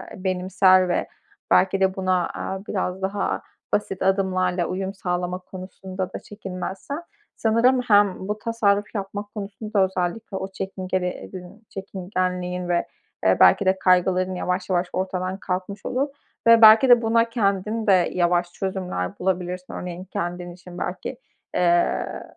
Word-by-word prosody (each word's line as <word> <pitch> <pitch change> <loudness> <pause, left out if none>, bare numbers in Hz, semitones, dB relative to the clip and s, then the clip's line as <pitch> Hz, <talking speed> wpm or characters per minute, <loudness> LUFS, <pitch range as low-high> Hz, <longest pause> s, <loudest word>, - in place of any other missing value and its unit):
benimser 185 0 +3
ve 175 - 0 0.4
belki 190 +1 +4
de 190 0 +2
buna, 185 -2 +1
aaa, 190 +1 -5
biraz 185 -1 -2
daha 195 +1 -1 0.3
basit 195 -2 -1
adımlarla 185 -2 +1
uyum 190 +2 -3
sağlama 180 -1 -2
konusunda 185 0 -7
da - - -4
çekinmezsen 200 - -6 0.3
sanırım 235 +3 +3
hem 205 -5 +3
bu 210 +1 -2
tasarruf 210 -3 +1
yapmak 205 +1 -5
konusunda 205 0 -1
özellikle 190 +3 -3
o 190 - -4
çekingeli 185 -1 -3
edin 185 +3 -8
çekingenliğin 180 -2 -3
ve, 175 -1 +1 0.4
eee, - - +4
belki 200 - +6
de 190 0 +2
kaygıların 185 0 +3
yavaş 180 +1 -2
yavaş 180 -1 +1
ortadan 185 0 -2
kalkmış 190 +2 -4
olur 265 +3 0 0.4
ve 230 0 +8
belki 220 +4 +9
de 240 -1 +8
buna 230 0 +2
kendin 215 0 0
de 185 -3 +4
yavaş 175 0 +1
çözümler 185 - -3
bulabilirsin. 180 0 -2
Örneğin 180 0 -6
kendin 175 -1 -4
için 175 0 -12
belki, - - -4 0.4
eee, 175 -1 +1
190 Hz, 135 wpm, -23 LUFS, 180-200 Hz, 0.4 s, belki